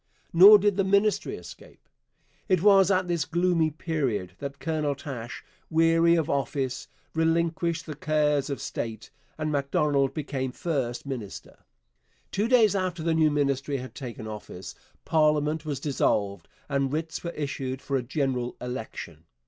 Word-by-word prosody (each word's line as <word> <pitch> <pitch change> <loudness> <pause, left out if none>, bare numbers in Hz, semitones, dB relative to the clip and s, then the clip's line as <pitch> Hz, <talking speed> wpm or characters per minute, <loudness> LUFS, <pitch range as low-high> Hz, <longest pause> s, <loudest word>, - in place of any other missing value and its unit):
Nor 195 +5 +10
did 205 -1 +1
the 195 - +3
Ministry 200 +2 +2
escape. - - -13 0.6
It 185 -2 +2
was 195 -2 +6
at 185 -2 +2
this 170 -3 0
gloomy 170 -1 +1
period 135 - -2
that 140 0 -6
Colonel 155 -3 -1
Taché, 125 -4 -7 0.3
weary 165 +1 +4
of 160 -3 0
office, 135 -3 -2 0.3
relinquished 165 +1 0
the 155 - -5
cares 150 -1 +1
of 140 - -3
state, 110 -2 -5 0.3
and 155 -1 -2
Macdonald 140 -1 +1
became 135 -4 -3
first 130 -8 -2
minister. 125 -8 -7 0.7
Two 205 +3 0
days 230 -5 +4
after 185 -4 -2
the 165 0 +1
new 160 -1 +4
Ministry 140 -1 0
had 130 0 -8
taken 120 -5 -7
office 105 -4 -8 0.3
parliament 155 -1 +2
was 145 -3 -2
dissolved 105 -8 0 0.2
and 140 -2 0
writs 160 +2 -3
were 170 - -3
issued 135 -3 -4
for 140 - -3
a 130 - +1
general 125 -1 -2
election. 110 - -7
150 Hz, 145 wpm, -27 LUFS, 135-165 Hz, 0.7 s, Nor